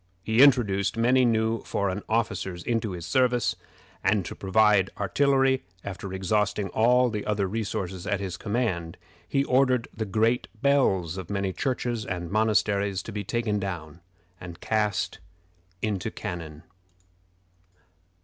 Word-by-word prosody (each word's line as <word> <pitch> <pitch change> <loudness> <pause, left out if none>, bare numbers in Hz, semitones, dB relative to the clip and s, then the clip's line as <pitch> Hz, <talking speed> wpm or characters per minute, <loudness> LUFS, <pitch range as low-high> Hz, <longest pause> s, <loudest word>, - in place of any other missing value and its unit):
He 110 +3 +3
introduced 115 -8 +4
many 125 +2 +4
new 110 -1 +1
foreign 100 0 -2
officers 100 -6 -1
into 115 -4 -1
his 85 -2 -6
service; 120 -1 +2 0.5
and 105 -4 +2
to - - -5
provide 100 0 +3
artillery, 135 +5 +2 0.2
after 100 0 -6
exhausting 105 +1 0
all 125 +4 +3
the 105 -2 -3
other 105 -2 0
resources 95 -3 -4
at 105 -2 0
his 95 -3 -4
command, 100 -7 -2 0.3
he 140 - +2
ordered 130 -2 +2
the 110 - -2
great 110 +5 +1
bells 95 - +2
of 95 -3 -7
many 100 -2 -1
churches 120 -3 -2
and 90 -3 -5
monasteries 100 -2 +1
to - - -7
be 105 -1 -4
taken 110 0 -1
down 85 -4 -6 0.4
and 85 -1 -9
cast 105 -1 -1 0.6
into 105 0 -1
cannon. 85 -8 -7
105 Hz, 130 wpm, -26 LUFS, 95-115 Hz, 0.6 s, introduced